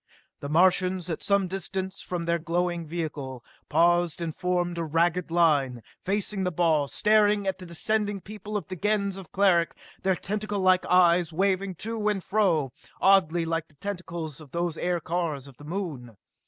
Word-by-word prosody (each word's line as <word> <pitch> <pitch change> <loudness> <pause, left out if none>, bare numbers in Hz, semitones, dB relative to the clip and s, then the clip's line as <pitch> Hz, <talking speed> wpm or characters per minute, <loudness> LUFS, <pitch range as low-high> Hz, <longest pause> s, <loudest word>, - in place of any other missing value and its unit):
The 140 - -6
Martians, 180 +2 +3
at 160 - -4
some 200 -2 +2
distance 190 +1 -4
from 175 -2 -4
their 170 0 +1
glowing 175 0 -1
vehicle, 150 -6 -5 0.2
paused 175 -1 +3
and 165 -2 -4
formed 175 -1 -1
a - - -1
ragged 165 +2 +1
line, 145 -8 +2 0.2
facing 200 0 -1
the 180 - 0
ball, 160 -4 +2
staring 210 +2 +3
at 190 - -2
the 180 - -9
descending 205 +4 -1
people 210 +2 -6
of 180 -7 -6
the 185 - -5
Gens 200 +1 0
of 195 -4 -10
Cleric, 185 -4 +3 0.2
their 190 -1 +2
tentaclelike 195 -2 0
eyes 175 -2 +4
waving 190 +2 0
to 225 -2 -2
and 195 -3 -1
fro, 175 -10 +1 0.3
oddly 175 -4 +4
like 165 -1 -2
the 145 - -26
tentacles 170 -4 -5
of 150 - -13
those 170 +2 -2
aircars 170 -5 -2
of 135 -3 -15
the 145 - -13
Moon. 150 - -5
175 Hz, 165 wpm, -27 LUFS, 165-195 Hz, 0.3 s, eyes